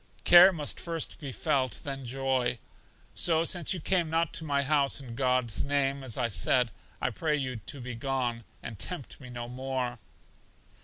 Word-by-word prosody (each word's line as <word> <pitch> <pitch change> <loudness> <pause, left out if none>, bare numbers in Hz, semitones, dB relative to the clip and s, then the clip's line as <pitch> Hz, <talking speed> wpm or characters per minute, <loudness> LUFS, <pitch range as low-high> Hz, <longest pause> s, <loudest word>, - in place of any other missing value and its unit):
Care 175 +2 +9
must 150 -5 -3
first 165 -3 -3
be 140 -4 -6
felt, 130 0 -1
then 135 -2 -5
joy. 130 -1 0 0.6
So 165 -1 +3
since 175 -2 +2
you 185 - -1
came 175 0 +1
not 165 0 0
to - - -1
my 140 -2 +1
house 140 -1 +2
in 130 -4 -8
God's 125 -3 +1
name, 140 -1 0
as 125 -4 -2
I 125 -2 +1
said, 120 +3 +2 0.3
I 125 - -1
pray 150 +6 0
you 130 -4 -3
to 125 +6 -6
be 125 0 -6
gone, 120 -1 -2 0.2
and 115 -4 -7
tempt 175 -8 -4
me 125 - -10
no 120 -1 -6
more. 125 -1 -3
135 Hz, 175 wpm, -29 LUFS, 125-150 Hz, 0.6 s, Care